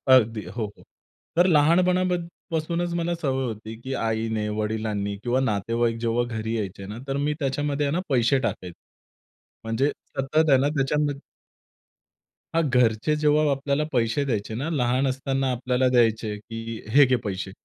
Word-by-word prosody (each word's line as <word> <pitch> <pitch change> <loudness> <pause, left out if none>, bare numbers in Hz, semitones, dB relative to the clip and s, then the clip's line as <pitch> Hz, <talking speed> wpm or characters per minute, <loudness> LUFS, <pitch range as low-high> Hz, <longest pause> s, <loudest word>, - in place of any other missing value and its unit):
अगदी, 115 -3 +2
हो, 115 -3 -4
हो. - - -17 0.5
तर 175 - +6
लहानपणापासूनच 175 0 +1
मला 170 0 0
सवय 135 -5 -1
होती, 110 -1 -6
की 135 +1 -4
आईने, 110 -2 -1
वडिलांनी 105 -2 -2
किंवा 125 +2 +1
नातेवाईक 115 0 0
जेव्हा 120 +1 +1
घरी 110 +1 -2
यायचे 100 -2 -5
ना, 105 - -7
तर 135 0 -1
मी 150 +1 0
त्याच्यामध्ये 145 +1 -1
ना 175 - 0
पैसे 130 +1 +3
टाकत. 90 -8 -3 0.9
म्हणजे 115 +6 +1 0.2
सतत 155 +4 +1
आहे 135 - +7
ना, 140 - +2
त्याच्यामध 145 +1 0 1.3
हां, 165 - +3
घरचे 125 +2 +2
जेव्हा 150 0 +3
आपल्याला 140 +2 0
पैसे 115 +2 +1
द्यायचे 110 -4 -2
ना, 140 +7 -2
लहान 130 -2 +1
असताना 135 0 -1
आपल्याला 125 +1 +1
द्यायचे, 115 -3 +2
की 115 +1 -7
"हे 140 +4 +7
घे 130 - +3
पैसे." 95 0 -3
130 Hz, 145 wpm, -25 LUFS, 115-145 Hz, 1.3 s, आहे